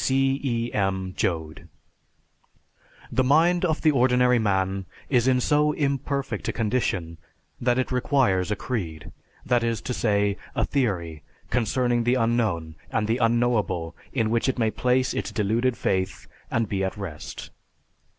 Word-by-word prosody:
_ - - -2
C. 135 +1 +2
E. 120 -3 -1
M. 95 -2 -1
JOAD. 80 -3 -2 1.5
_The 130 - +3
mind 165 +7 +4
of 160 -3 +1
the 155 - +5
ordinary 125 -2 +3
man 95 -2 0 0.2
is 125 -2 +3
in 130 -1 +4
so 150 +3 +2
imperfect 140 -1 -2
a - - +1
condition 100 -8 -1 0.4
that 120 0 +1
it 130 - -1
requires 125 -8 +2
a 105 - 0
creed; 90 - -4 0.3
that 120 -2 +2
is 115 -2 0
to 125 - -3
say, 100 -3 +1 0.2
a - - +1
theory 90 - -1 0.3
concerning 120 0 +1
the 120 +2 +2
unknown 110 -10 0 0.2
and 110 - 0
the 115 +2 +1
unknowable 115 -8 +1 0.2
in 115 -4 0
which 115 +3 +1
it 130 - -1
may 110 -2 +1
place 130 +2 +1
its - - -3
deluded 115 +3 0
faith 95 0 -1 0.2
and 115 -1 0
be 95 -1 -1
at 95 +2 -2
rest. 90 -7 -7
115 Hz, 150 wpm, -25 LUFS, 95-130 Hz, 1.5 s, the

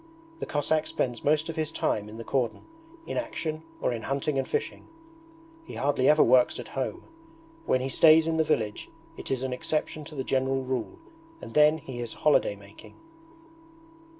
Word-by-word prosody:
The - - -4
Cossack 155 +1 0
spends 120 -3 -2
most 155 +1 +2
of 165 - -5
his 155 -1 -2
time 105 -8 -1
in 110 - -10
the 115 - -6
cordon, 125 -1 -1 0.4
in - - -4
action, 160 - -3 0.2
or - - +1
in 115 - -4
hunting 140 +3 -1
and - - -2
fishing. 445 - -3 0.8
He - - -10
hardly 140 -2 +2
ever 150 0 +6
works 125 0 +4
at - - -8
home. - - -4 0.6
When 130 - +2
he 130 - -2
stays 160 +3 +6
in 165 0 0
the 160 - +4
village 110 -9 -1 0.3
it - - -8
is 130 -1 -1
an 130 -1 -2
exception 155 +3 -2
to 155 - -10
the 135 - -2
general 135 0 0
rule 130 -3 -3 0.4
and - - -10
then 150 +1 +5
he 130 -5 -8
is 120 -2 -5
holiday 150 -8 +2
making. 100 +1 -15
135 Hz, 180 wpm, -27 LUFS, 125-155 Hz, 0.8 s, ever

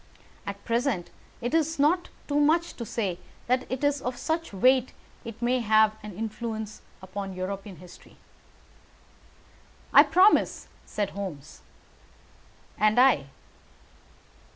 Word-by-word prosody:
At - - -6
present 235 -6 -1 0.3
it 240 +4 -3
is 320 0 +1
not 325 +5 +2 0.2
too 290 0 +1
much 325 +3 +2
to 235 - -6
say 190 -6 -2 0.3
that 255 +1 0
it 260 +2 -3
is 285 -1 +1
of 250 0 -4
such 325 +4 -2
weight 255 +5 +3 0.4
that 230 - -6
it 230 +1 -12
may 250 +1 +2
have 215 -1 +4
an 210 -3 -9
influence 220 -1 -5 0.2
upon 195 +1 -6
European 195 +1 -5
history." 175 +2 -15 1.8
"I - - +10
promise," 380 +4 +3 0.2
said 205 -2 -2
Holmes. 165 -7 -7 1.2
"And 215 +2 +4
I." 250 - +4
230 Hz, 125 wpm, -27 LUFS, 200-270 Hz, 1.8 s, I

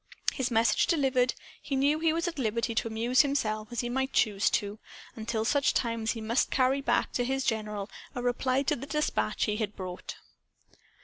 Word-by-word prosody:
His 260 -2 -1
message 225 -2 +3
delivered, 265 -6 +2 0.3
he 275 - -3
knew 285 +3 +2
he 325 0 +3
was 335 +2 -1
at 335 -4 -4
liberty 230 0 0
to 225 - 0
amuse 230 +3 +3
himself 220 -7 -1
as 240 - -2
he 240 - -3
might 265 +2 -1
choose 205 -3 +3
to, 205 +1 -1 0.4
until 220 0 -2
such 280 +3 +2
time 230 -2 0
as 220 - 0
he 225 - -6
must 230 +3 +1
carry 265 +1 +2
back - - +1
to 245 - 0
his 265 +2 -1
general 210 -3 -2 0.3
a 245 - -3
reply 255 +2 +1
to - - +1
the 270 +3 -8
dispatch 300 0 0
he 210 -1 0
had 210 -2 -3
brought. 185 -2 -6
245 Hz, 195 wpm, -29 LUFS, 220-270 Hz, 0.4 s, message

